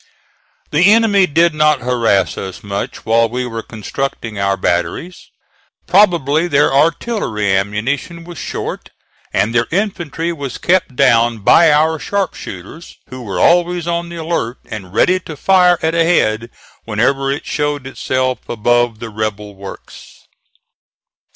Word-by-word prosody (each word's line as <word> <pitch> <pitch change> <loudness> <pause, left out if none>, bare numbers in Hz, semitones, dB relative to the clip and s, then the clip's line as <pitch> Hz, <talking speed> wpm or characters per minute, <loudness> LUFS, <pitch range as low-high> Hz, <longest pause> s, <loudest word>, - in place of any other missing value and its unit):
The 180 +7 +5
enemy 210 -4 +4
did 165 +2 +3
not 150 -2 +2
harass 115 -6 +1
us 95 -1 -7
much 100 -1 -5
while 115 +1 +3
we 125 +2 -3
were 115 -2 -5
constructing 110 0 -5
our 100 0 +1
batteries. 90 - -2 0.6
Probably 170 -5 +3
their 145 -3 +2
artillery 140 - +1
ammunition 115 - -2
was 175 -1 -10
short; - - -5 0.4
and 105 +4 0
their 115 0 +2
infantry 170 -4 -2
was 140 -5 -6
kept 175 -7 +1
down 115 -2 +3
by 165 +8 +6
our 155 +2 +2
sharpshooters, 165 - -5
who 130 0 -8
were 105 -5 -4
always 175 0 +3
on 170 0 -2
the 170 - -8
alert 160 -8 -3
and 95 -4 -8
ready 185 - +3
to 160 -4 -9
fire 180 +1 +4
at 160 0 +1
a 170 0 +3
head 115 -9 +1 0.3
whenever 135 +5 0
it 140 - -4
showed 145 -2 -2
itself 130 -1 -2
above 120 0 +1
the 115 +1 -7
rebel 105 -1 -4
works. 100 0 -12
135 Hz, 140 wpm, -16 LUFS, 110-170 Hz, 0.6 s, by